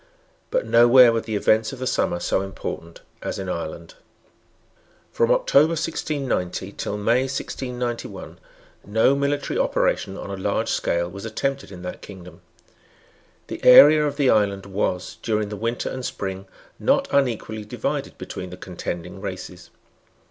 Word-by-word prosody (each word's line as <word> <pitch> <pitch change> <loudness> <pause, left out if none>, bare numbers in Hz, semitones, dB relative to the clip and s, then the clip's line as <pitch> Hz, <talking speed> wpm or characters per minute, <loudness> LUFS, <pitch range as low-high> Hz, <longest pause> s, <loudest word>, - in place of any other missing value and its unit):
But - - 0
nowhere 120 0 +7
were 115 - 0
the 110 -1 -4
events 110 +2 +2
of 135 - -8
the 130 - -4
summer 85 -7 0
so 95 - 0
important 95 - -7 0.2
as - - -4
in - - -5
Ireland. - - -5 1.2
From 470 0 +1
October - - +4
1690 135 - -2
till 105 - -4
May 115 +5 +2
1691, 125 -3 -5 0.4
no 110 +6 +3
military 140 +1 -1
operation 95 0 0
on 100 - -7
a 95 -1 -6
large - - 0
scale 85 0 0
was 100 +3 -9
attempted 135 +3 -3
in 90 -2 -10
that 90 - -6
kingdom. 90 -3 -12 1.0
The - - -8
area 150 +4 +9
of 145 -1 -2
the 140 -3 +4
island 100 -2 +1
was, 95 -2 -3
during 105 -2 -1
the 105 - -5
winter 115 +3 -2
and 130 - -5
spring, 95 -4 -5 0.3
not - - +2
unequally 115 -5 0
divided 105 - -4
between 90 - -7
the 90 - -9
contending 90 0 -6
races. 95 -2 -7
110 Hz, 145 wpm, -23 LUFS, 95-135 Hz, 1.2 s, area